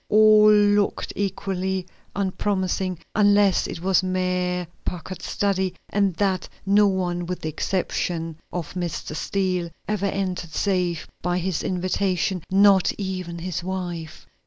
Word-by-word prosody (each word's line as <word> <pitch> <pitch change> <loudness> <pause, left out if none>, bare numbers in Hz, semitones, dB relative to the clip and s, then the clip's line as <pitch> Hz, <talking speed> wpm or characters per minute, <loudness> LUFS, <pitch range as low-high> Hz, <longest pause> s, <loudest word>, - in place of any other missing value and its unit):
All 215 0 +7
looked 205 -1 +3
equally 190 -1 -2 0.3
unpromising, 190 -2 -1 0.2
unless 205 -2 +4
it 165 - -6
was 190 +1 +3
Mayor 180 -1 -1 0.2
Packard's 180 +1 -5
study, 190 -2 0
and 200 -3 +1
that 190 -1 0 0.2
no 205 +1 +5
one 175 -2 -1
with 180 0 -4
the 155 - -2
exception 165 -1 -2
of 175 -4 -4
Mr. 175 -4 -4
Steele 185 -1 -1 0.2
ever 205 -2 0
entered 185 -4 -3
save 180 -3 0
by 180 0 0
his 180 -2 -1
invitation, 185 -1 0
not 195 -1 +5
even 185 -3 -4
his 175 0 -4
wife. 175 -3 -5
185 Hz, 125 wpm, -24 LUFS, 180-195 Hz, 0.3 s, All